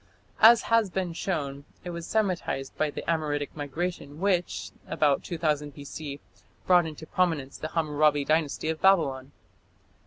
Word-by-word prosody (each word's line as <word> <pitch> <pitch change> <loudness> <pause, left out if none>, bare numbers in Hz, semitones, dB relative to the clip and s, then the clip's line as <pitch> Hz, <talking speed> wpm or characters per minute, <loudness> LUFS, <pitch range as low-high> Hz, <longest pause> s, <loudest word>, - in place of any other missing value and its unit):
As 225 +1 +8
has 230 -3 +3
been 180 -1 -2
shown, 140 -6 -3 0.2
it 175 - -5
was 170 -1 -6
Semitized 185 -10 -1
by 155 - 0
the - - -6
Amoritic 150 -3 -1
migration 150 +1 -4
which, 180 -2 0 0.2
about 150 -4 +2
2000 150 -4 -2
B.C., 145 0 -7 0.5
brought 175 -2 +5
into 155 0 -8
prominence 160 -6 -1
the 155 - -3
Hammurabi 150 -2 +1
Dynasty 155 0 0
of 160 -1 -3
Babylon. 140 -9 +3
155 Hz, 135 wpm, -27 LUFS, 145-175 Hz, 0.5 s, As